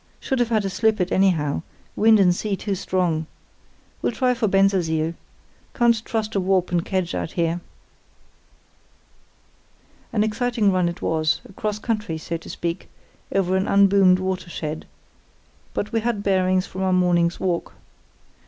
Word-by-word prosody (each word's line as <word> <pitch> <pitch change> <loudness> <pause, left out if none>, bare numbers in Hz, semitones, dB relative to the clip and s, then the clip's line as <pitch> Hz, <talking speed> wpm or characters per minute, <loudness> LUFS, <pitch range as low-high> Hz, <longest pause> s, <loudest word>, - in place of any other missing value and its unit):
Should 265 -2 -2
have 240 -1 +1
had 215 -3 +1
to 195 - -1
slip 220 +1 +1
it 180 - 0
anyhow; 165 -8 +2 0.3
wind 220 0 +5
and 180 -2 +5
sea 205 +1 -2
too 200 +1 -3
strong. 175 -4 -1 0.7
We'll - - 0
try 250 +2 +1
for 230 -2 0
Bensersiel. 180 -5 +2 0.6
Can't 235 -3 +3
trust 220 -2 -2
to 200 - 0
a - - 0
warp 185 -1 +1
and 175 -1 +1
kedge 185 -2 -2
out - - -3
here.' 170 0 0 2.5
"An 215 -4 +2
exciting 220 -1 +1
run 180 -2 +2
it 170 - -8
was, 155 -1 +1
across 210 +2 -3
country, 215 -7 -2
so 165 +2 -5
to 165 - -13
speak, 170 +1 -4 0.4
over 190 -1 +1
an 190 +1 0
unboomed 195 -2 +5
watershed; 180 -4 -4 0.9
but 210 - -2
we 230 - +1
had 220 -2 -2
bearings 185 -1 +2
from 190 - -7
our 190 -1 +1
morning's 175 -2 +2
walk. 180 -3 -2
190 Hz, 155 wpm, -23 LUFS, 175-210 Hz, 2.5 s, wind